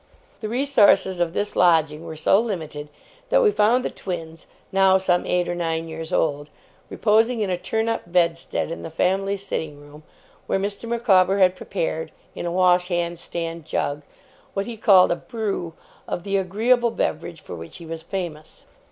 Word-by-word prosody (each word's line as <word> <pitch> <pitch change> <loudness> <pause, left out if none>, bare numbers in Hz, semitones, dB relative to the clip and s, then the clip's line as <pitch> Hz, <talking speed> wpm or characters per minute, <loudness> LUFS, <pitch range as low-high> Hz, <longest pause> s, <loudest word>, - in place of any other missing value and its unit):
The 215 - -5
resources 215 -8 +3
of 170 -1 0
this 205 +1 -2
lodging 160 -3 +3
were 160 - -6
so 160 +5 +3
limited, 160 -9 -4 0.4
that - - +4
we 430 - +5
found 240 - +3
the - - -2
twins, 165 -3 -7 0.2
now 190 -1 +5
some 180 -2 +1
eight 180 0 +1
or - - -1
nine 165 -1 -2
years 160 +1 -7
old, 145 -4 0 0.4
reposing 225 +2 +2
in 200 -3 0
a - - +2
turn 220 +5 -2
up 225 -6 -3
bedstead 170 -2 0
in 165 - -5
the - - -6
family 195 +4 0
sitting 160 -7 -5
room, 145 +1 -14 0.5
where - - +1
Mr. 200 +3 -4
Micawber 195 -5 +3
had 185 -1 +4
prepared, - - -3 0.2
in - - -5
a - - -2
wash 180 0 +3
hand 175 -1 -2
stand 165 -1 -5
jug, 145 -2 -2 0.5
what 195 0 -1
he 235 - -6
called 195 -5 +5
'a - - +2
Brew' 200 -8 -4 0.3
of 175 - -4
the 200 0 -2
agreeable 225 +6 +2
beverage 165 -6 -3
for - - -9
which 80 -1 -9
he 170 - -11
was 165 0 -6
famous. 165 -3 -6
180 Hz, 180 wpm, -23 LUFS, 165-205 Hz, 0.5 s, we